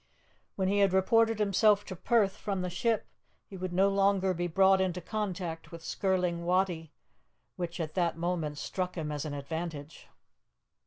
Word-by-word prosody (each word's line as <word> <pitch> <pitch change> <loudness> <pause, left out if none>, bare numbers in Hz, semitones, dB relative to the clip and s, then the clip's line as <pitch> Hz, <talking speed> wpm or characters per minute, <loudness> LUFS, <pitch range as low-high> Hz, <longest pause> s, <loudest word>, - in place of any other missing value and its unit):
When 190 -1 0
he 200 +1 +2
had 195 -2 +4
reported 225 +4 +3
himself 205 0 +3
to 185 - -6
Perth 205 +1 +2
from 195 -3 -3
the 180 - -3
ship, 225 +4 0 0.4
he 195 - -11
would 185 -1 -4
no 190 +3 +3
longer 195 -1 +2
be 175 0 -2
brought 190 +2 +4
into 180 -1 -1
contact 180 -4 -4
with 165 -1 -9
Skirling 180 -3 0
Wattie, 175 -3 0 0.6
which 175 0 -4
at 155 -2 -3
that 170 -3 0
moment 165 -3 -2
struck 180 +3 -3
him 155 -2 -3
as 150 0 -3
an 145 -1 -4
advantage. 155 +1 -6
180 Hz, 165 wpm, -30 LUFS, 170-195 Hz, 0.6 s, had